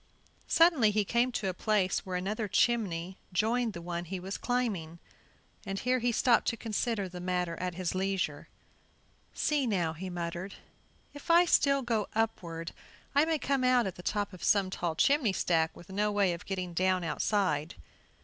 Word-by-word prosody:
Suddenly 330 Hz, -10 st, +5 dB
he 210 Hz, 0 st, +1 dB
came 240 Hz, +4 st, +1 dB
to 215 Hz, -, -2 dB
a 185 Hz, -, -1 dB
place 195 Hz, 0 st, +1 dB
where 185 Hz, -1 st, -5 dB
another 205 Hz, +4 st, -2 dB
chimney 190 Hz, -5 st, 0 dB
joined 225 Hz, +4 st, +1 dB
the 170 Hz, -, -8 dB
one 175 Hz, 0 st, -4 dB
he 185 Hz, +2 st, -5 dB
was 190 Hz, +2 st, -5 dB
climbing, 205 Hz, -10 st, -2 dB, 0.7 s
and 195 Hz, 0 st, -4 dB
here 255 Hz, +4 st, +1 dB
he 240 Hz, 0 st, +1 dB
stopped 235 Hz, +1 st, +3 dB
to 230 Hz, -, 0 dB
consider 225 Hz, -2 st, -2 dB
the 180 Hz, 0 st, -8 dB
matter 180 Hz, -1 st, -1 dB
at 180 Hz, -1 st, -3 dB
his 180 Hz, -1 st, -2 dB
leisure. 185 Hz, -6 st, -2 dB, 0.9 s
"See 290 Hz, -4 st, +1 dB
now," 175 Hz, -7 st, 0 dB
he 185 Hz, +4 st, -6 dB
muttered, 175 Hz, +2 st, -5 dB, 0.6 s
"if 290 Hz, +2 st, -12 dB
I 340 Hz, +1 st, +7 dB
still 275 Hz, -5 st, +3 dB
go 225 Hz, -4 st, 0 dB
upward 170 Hz, -7 st, -2 dB, 0.4 s
I 285 Hz, +2 st, +4 dB
may 320 Hz, -1 st, +1 dB
come 275 Hz, -2 st, 0 dB
out 250 Hz, -2 st, +4 dB
at 190 Hz, -, -3 dB
the 180 Hz, -, -11 dB
top 205 Hz, +2 st, -2 dB
of 185 Hz, -, -10 dB
some 195 Hz, -2 st, +3 dB
tall 170 Hz, -3 st, -2 dB
chimney 275 Hz, -, +3 dB
stack 165 Hz, -3 st, +1 dB
with 175 Hz, -, -14 dB
no 210 Hz, +2 st, 0 dB
way 200 Hz, -3 st, +2 dB
of 170 Hz, -, -9 dB
getting 185 Hz, -2 st, -3 dB
down 185 Hz, +1 st, +1 dB
outside. 165 Hz, -2 st, 0 dB
195 Hz, 180 wpm, -30 LUFS, 180-235 Hz, 0.9 s, I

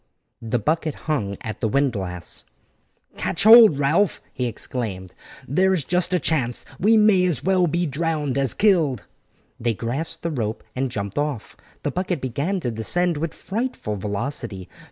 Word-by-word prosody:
The 115 Hz, +1 st, -1 dB
bucket 155 Hz, +5 st, -1 dB
hung 110 Hz, -11 st, -1 dB
at 110 Hz, -, -6 dB
the -, -, +1 dB
windlass. 100 Hz, -, -1 dB, 0.7 s
"Catch -, -, -1 dB
hold, 220 Hz, -7 st, +9 dB
Ralph!" 155 Hz, +7 st, +2 dB
he 125 Hz, -2 st, -1 dB
exclaimed; 105 Hz, -6 st, -5 dB, 0.3 s
"there 190 Hz, +8 st, +3 dB
is 155 Hz, -7 st, -2 dB
just 180 Hz, 0 st, +1 dB
a 180 Hz, -, +3 dB
chance, 130 Hz, -6 st, 0 dB
and -, -, -10 dB
we 225 Hz, +1 st, +6 dB
may 210 Hz, -4 st, +5 dB
as 175 Hz, -7 st, -1 dB
well 185 Hz, -1 st, +3 dB
be 175 Hz, +2 st, 0 dB
drowned 150 Hz, -2 st, -1 dB
as 135 Hz, -3 st, 0 dB
killed." 165 Hz, -, +2 dB, 0.5 s
They 115 Hz, -1 st, 0 dB
grasped 130 Hz, +10 st, -4 dB
the 170 Hz, -, -1 dB
rope 115 Hz, -6 st, -3 dB
and 130 Hz, +1 st, -1 dB
jumped 100 Hz, +2 st, -3 dB
off. 145 Hz, -7 st, -3 dB, 0.3 s
The -, -, -1 dB
bucket 180 Hz, -2 st, -2 dB
began 140 Hz, +10 st, -2 dB
to 120 Hz, -, -2 dB
descend 170 Hz, +10 st, +1 dB
with 160 Hz, +1 st, -2 dB
frightful 220 Hz, -, -3 dB
velocity. 105 Hz, -1 st, -3 dB
145 Hz, 160 wpm, -23 LUFS, 115-175 Hz, 0.7 s, hold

